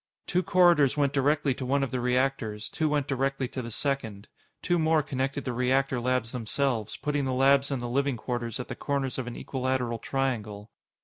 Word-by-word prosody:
Two 180 Hz, -, +1 dB
corridors 175 Hz, -6 st, +4 dB
went 140 Hz, -1 st, +2 dB
directly 145 Hz, 0 st, +2 dB
to 130 Hz, -, -6 dB
one 135 Hz, +2 st, +1 dB
of 130 Hz, -, -2 dB
the 130 Hz, -, -1 dB
reactors, 125 Hz, -4 st, 0 dB
two 155 Hz, -1 st, 0 dB
went 145 Hz, -2 st, +1 dB
directly 135 Hz, 0 st, -1 dB
to 130 Hz, -, -4 dB
the 115 Hz, -, -6 dB
second. 110 Hz, -5 st, -3 dB, 0.4 s
Two 175 Hz, -1 st, +2 dB
more 160 Hz, -1 st, +3 dB
connected 135 Hz, 0 st, -2 dB
the 125 Hz, -, -2 dB
reactor 130 Hz, +1 st, +1 dB
labs 125 Hz, -1 st, 0 dB
themselves, 120 Hz, -2 st, -1 dB
putting 145 Hz, -2 st, -1 dB
the 130 Hz, -, -1 dB
labs 135 Hz, +2 st, +4 dB
and 135 Hz, -3 st, -2 dB
the -, -, -2 dB
living 135 Hz, +1 st, 0 dB
quarters 120 Hz, 0 st, -3 dB
at 125 Hz, -, -5 dB
the -, -, -5 dB
corners 140 Hz, -2 st, -2 dB
of 125 Hz, -, -4 dB
an 125 Hz, -, -5 dB
equilateral 130 Hz, -3 st, -2 dB
triangle. 110 Hz, -7 st, -3 dB
130 Hz, 195 wpm, -28 LUFS, 120-140 Hz, 0.4 s, corridors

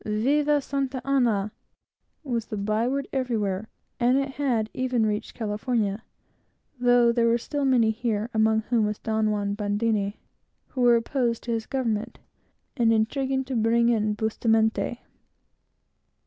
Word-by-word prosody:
"Viva 285 Hz, +7 st, +1 dB
Santa 270 Hz, -1 st, -2 dB
Ana!" 235 Hz, -7 st, +1 dB, 0.7 s
was 235 Hz, -5 st, -3 dB
the 215 Hz, -, -5 dB
by 215 Hz, +3 st, 0 dB
word 275 Hz, +2 st, -2 dB
everywhere, 220 Hz, -6 st, -1 dB, 0.3 s
and 250 Hz, +2 st, +3 dB
it 275 Hz, 0 st, 0 dB
had 255 Hz, -6 st, 0 dB
even 255 Hz, -3 st, 0 dB
reached 210 Hz, +1 st, -3 dB
California, 215 Hz, -1 st, -1 dB, 0.8 s
though 245 Hz, -1 st, +4 dB
there 235 Hz, 0 st, +2 dB
were 230 Hz, 0 st, +3 dB
still 285 Hz, +4 st, -3 dB
many 240 Hz, -4 st, +3 dB
here, 220 Hz, -1 st, -2 dB
among 220 Hz, 0 st, +3 dB
whom 225 Hz, -2 st, +1 dB
was 210 Hz, 0 st, -3 dB
Don 220 Hz, -1 st, 0 dB
Juan 205 Hz, -1 st, -1 dB
Bandini, 205 Hz, 0 st, -1 dB, 0.5 s
who 255 Hz, -, -4 dB
were 240 Hz, -1 st, +6 dB
opposed 235 Hz, 0 st, -1 dB
to 240 Hz, -, -4 dB
his 225 Hz, -1 st, -2 dB
government, 230 Hz, -6 st, -2 dB, 0.6 s
and 235 Hz, -4 st, +3 dB
intriguing 265 Hz, +4 st, 0 dB
to 260 Hz, 0 st, -5 dB
bring 235 Hz, +1 st, +3 dB
in 215 Hz, -2 st, +1 dB
Bustamente. 220 Hz, +2 st, 0 dB
230 Hz, 140 wpm, -25 LUFS, 215-255 Hz, 0.8 s, were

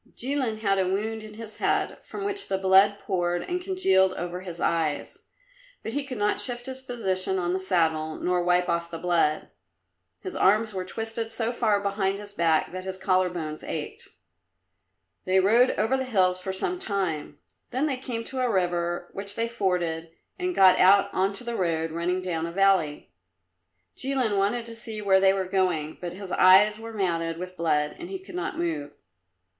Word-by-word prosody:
Jilin 250 Hz, -4 st, 0 dB
had 195 Hz, -2 st, +2 dB
a 185 Hz, -, +1 dB
wound 215 Hz, +4 st, -2 dB
in 215 Hz, 0 st, -11 dB
his 225 Hz, -1 st, -7 dB
head, -, -, 0 dB
from 400 Hz, -, -7 dB
which 400 Hz, 0 st, -2 dB
the 190 Hz, -, 0 dB
blood 190 Hz, +2 st, +5 dB
poured 175 Hz, -3 st, -1 dB
and 360 Hz, 0 st, -3 dB
congealed 190 Hz, -, +3 dB
over 180 Hz, 0 st, -5 dB
his 175 Hz, -2 st, -8 dB
eyes, 160 Hz, -4 st, -1 dB, 0.6 s
but 220 Hz, -, -5 dB
he 285 Hz, +1 st, -1 dB
could 265 Hz, -3 st, -6 dB
not 210 Hz, 0 st, +1 dB
shift 245 Hz, -1 st, -2 dB
his 260 Hz, 0 st, -6 dB
position 190 Hz, -7 st, -1 dB
on 175 Hz, -1 st, 0 dB
the 190 Hz, -, 0 dB
saddle, 160 Hz, -4 st, 0 dB
nor 180 Hz, 0 st, 0 dB
wipe 180 Hz, 0 st, +2 dB
off 170 Hz, 0 st, -1 dB
the 165 Hz, -, -6 dB
blood. 165 Hz, -3 st, +1 dB, 0.7 s
His 375 Hz, -, -5 dB
arms 215 Hz, +3 st, +3 dB
were 185 Hz, -1 st, -3 dB
twisted 225 Hz, +3 st, -4 dB
so 225 Hz, +1 st, -1 dB
far 220 Hz, -4 st, +1 dB
behind 200 Hz, -1 st, -1 dB
his 205 Hz, 0 st, -9 dB
back 165 Hz, -4 st, +2 dB
that 185 Hz, +1 st, -6 dB
his 190 Hz, 0 st, -5 dB
collar 185 Hz, -1 st, +2 dB
bones 155 Hz, -3 st, -5 dB
ached. -, -, -6 dB, 1.2 s
They 185 Hz, +1 st, +3 dB
rode 230 Hz, +7 st, +5 dB
over 225 Hz, +5 st, +2 dB
the 265 Hz, 0 st, -1 dB
hills 185 Hz, -6 st, +2 dB
for 190 Hz, -, -3 dB
some 355 Hz, -, -2 dB
time, 175 Hz, -, -3 dB, 0.3 s
then 260 Hz, +4 st, 0 dB
they 275 Hz, -4 st, -1 dB
came 245 Hz, -3 st, -5 dB
to 260 Hz, +3 st, -6 dB
a 250 Hz, -, +1 dB
river 175 Hz, -3 st, 0 dB
which 200 Hz, +1 st, -5 dB
they 230 Hz, 0 st, 0 dB
forded 175 Hz, -7 st, -1 dB, 0.3 s
and 360 Hz, 0 st, -1 dB
got 185 Hz, -1 st, +6 dB
out 200 Hz, +2 st, +5 dB
on 190 Hz, +1 st, +1 dB
to 235 Hz, +4 st, -6 dB
a -, -, -3 dB
road 165 Hz, -5 st, -1 dB
running 175 Hz, +3 st, -1 dB
down 165 Hz, -2 st, -2 dB
a -, -, -6 dB
valley. 185 Hz, -, +1 dB, 0.8 s
Jilin 260 Hz, -6 st, +1 dB
wanted 205 Hz, +4 st, 0 dB
to 230 Hz, -, -9 dB
see 225 Hz, -1 st, -6 dB
where 195 Hz, -2 st, +4 dB
they 190 Hz, 0 st, +5 dB
were 190 Hz, -1 st, -1 dB
going, 180 Hz, -5 st, -1 dB
but 175 Hz, -1 st, -5 dB
his 190 Hz, 0 st, -8 dB
eyes 205 Hz, +3 st, +6 dB
were 225 Hz, 0 st, -8 dB
matted 165 Hz, -5 st, -1 dB
with 180 Hz, +1 st, -7 dB
blood 150 Hz, -3 st, 0 dB
and 345 Hz, -, -7 dB
he 385 Hz, -, -4 dB
could 375 Hz, 0 st, -13 dB
not 360 Hz, -, -3 dB
move. 160 Hz, -4 st, -3 dB
190 Hz, 190 wpm, -26 LUFS, 175-225 Hz, 1.2 s, got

